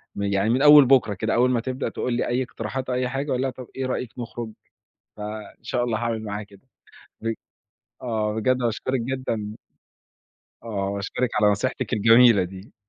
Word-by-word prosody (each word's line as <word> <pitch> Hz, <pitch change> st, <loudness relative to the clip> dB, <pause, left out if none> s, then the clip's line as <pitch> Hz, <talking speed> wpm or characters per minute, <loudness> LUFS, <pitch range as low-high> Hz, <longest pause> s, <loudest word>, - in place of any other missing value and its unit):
ما 100 Hz, 0 st, -2 dB
يعني 100 Hz, +1 st, +1 dB
من 125 Hz, +3 st, +2 dB
أول 145 Hz, -1 st, +9 dB
بُكرة 125 Hz, -5 st, +4 dB
كده، 95 Hz, -, -2 dB
أول 125 Hz, +2 st, +3 dB
ما 120 Hz, -, +2 dB
تبدأ 130 Hz, +3 st, -3 dB
تقول 125 Hz, -, -3 dB
لي 120 Hz, -, 0 dB
أي 125 Hz, +2 st, 0 dB
اقتراحات 125 Hz, +2 st, -5 dB
أو 125 Hz, -, 0 dB
أي 125 Hz, 0 st, 0 dB
حاجة، 135 Hz, +2 st, -3 dB
أقول 125 Hz, -, 0 dB
لها 135 Hz, -, 0 dB
طَب 125 Hz, -1 st, -9 dB
إيه 130 Hz, -, -2 dB
رأيك 125 Hz, -2 st, -3 dB
نخرج؟ 120 Hz, -1 st, -6 dB, 0.7 s
فإن 105 Hz, 0 st, -8 dB
شاء 120 Hz, 0 st, -1 dB
الله 115 Hz, -3 st, -1 dB
هاعمل 115 Hz, -1 st, -2 dB
معاها 105 Hz, 0 st, -4 dB
كده، 100 Hz, +5 st, -18 dB, 0.5 s
بج 115 Hz, 0 st, -1 dB, 0.7 s
آه، 110 Hz, -3 st, -1 dB
بجد 125 Hz, +4 st, +2 dB
باشكرِك 125 Hz, +2 st, -1 dB
جدًا. 115 Hz, -4 st, -3 dB, 1.1 s
آه، 100 Hz, -4 st, -3 dB
باشكرِك 110 Hz, +5 st, -2 dB
على 105 Hz, -1 st, +5 dB
نصيحتِك 120 Hz, +5 st, -2 dB
الجميلة 115 Hz, -1 st, +6 dB
دي، 95 Hz, +3 st, -10 dB
115 Hz, 180 wpm, -24 LUFS, 105-130 Hz, 1.1 s, أول